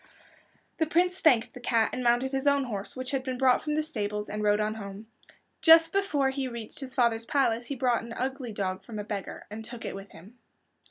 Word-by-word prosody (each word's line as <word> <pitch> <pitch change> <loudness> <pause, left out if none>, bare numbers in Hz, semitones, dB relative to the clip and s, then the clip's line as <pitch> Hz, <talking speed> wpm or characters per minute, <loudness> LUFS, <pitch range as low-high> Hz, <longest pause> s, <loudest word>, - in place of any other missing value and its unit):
The 320 - +2
Prince 360 +3 +2
thanked 250 -8 +3
the - - -9
cat, 230 -2 +1
and 255 - -3
mounted 245 +2 +2
his 270 +1 -1
own 280 -1 +4
horse, 205 -6 -5
which 255 +1 -4
had 270 -2 -1
been 260 -1 -3
brought 255 -1 +4
from 300 -1 -2
the 310 - +1
stables, 210 -7 -3
and 210 - -3
rode 210 0 +3
on 215 0 0
home. 200 -1 -8 0.6
Just 325 0 +7
before 300 -9 +1
he 265 -1 -2
reached 235 -3 -7
his 270 -2 -7
father's 235 -3 +2
palace 240 -5 +1
he 280 - -3
bought 245 -2 +1
an 230 0 -8
ugly 260 -1 -3
dog 190 -2 -3
from 225 -3 -8
a 210 - -3
beggar, 205 -2 -6
and 220 +1 -6
took 235 +1 -8
it - - -4
with 195 0 -9
him. 210 +9 -15
245 Hz, 225 wpm, -28 LUFS, 215-270 Hz, 0.6 s, Just